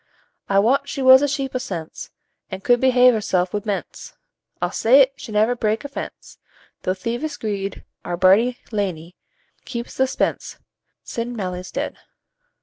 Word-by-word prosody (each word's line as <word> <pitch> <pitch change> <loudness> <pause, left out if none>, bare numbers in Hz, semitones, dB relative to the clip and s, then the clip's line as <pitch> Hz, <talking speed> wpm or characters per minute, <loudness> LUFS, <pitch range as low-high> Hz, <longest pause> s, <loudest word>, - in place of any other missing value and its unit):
"I 195 - +2
wat 270 +7 +2
she 275 - -3
was 260 +1 +8
a 290 - +2
sheep 275 -2 -3
o' 255 - -1
sense. 175 -10 -6 0.4
An' 190 -1 -6
could 245 +3 +3
behave 250 -1 +5
hersel' 190 -4 0
wi' 210 - -1
mense; 205 -2 -5 0.4
I'll - - -1
say't, 260 +3 +5
she 265 -5 -10
never 215 +3 +2
brak 220 +2 -1
a - - -2
fence, - - -8 0.4
Thro' 185 - -1
thievish 240 +10 -4
greed. 200 -2 -4 0.2
Our 175 0 -3
bardie, 205 +7 +4
lanely, 185 -5 -3 0.5
keeps 235 0 -6
the 265 - +3
spence, 260 - -2 0.5
Sin' 240 +1 -5
Mailie's 185 -3 -5
dead." - - -4
230 Hz, 155 wpm, -21 LUFS, 195-260 Hz, 0.5 s, was